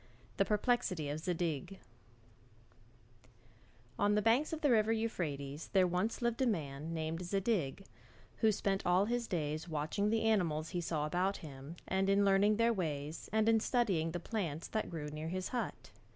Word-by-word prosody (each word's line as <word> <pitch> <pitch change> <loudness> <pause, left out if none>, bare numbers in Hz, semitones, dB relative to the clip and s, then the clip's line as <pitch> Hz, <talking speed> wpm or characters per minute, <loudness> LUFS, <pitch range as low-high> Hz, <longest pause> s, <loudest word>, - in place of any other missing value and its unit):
THE 195 - +3
PERPLEXITY 210 -8 +1
OF 150 +2 -3
ZADIG 170 +1 -2 2.2
On 205 0 +3
the 210 - +3
banks 240 +7 +3
of 320 -1 -4
the 290 - +3
river 220 -1 +4
Euphrates 155 -10 -3
there 190 -2 +5
once 180 +7 -1
lived 235 +1 0
a 260 - +3
man 155 -5 -2
called 160 +1 -2
Zadig, 195 - -1 0.5
who 220 -2 +4
spent 195 -1 -1
all 180 +3 +3
his 240 +1 -1
days 155 0 -2
watching 160 +7 -1
the 225 +1 +1
animals 170 -8 +1
he 175 - -2
saw 155 -3 -1
about 180 +5 0
him 140 +2 -9
and 190 +1 +1
in 200 +1 +4
learning 200 +2 +4
their 230 0 +3
ways, 155 -5 -3
and 220 0 +2
in 225 0 +5
studying 205 -9 +1
the 175 - -3
plants 170 -5 -3
that 220 - -2
grew 160 -3 -5
near 155 +1 -5
his 185 +2 -3
hut. 245 - -4
185 Hz, 165 wpm, -34 LUFS, 155-220 Hz, 2.2 s, there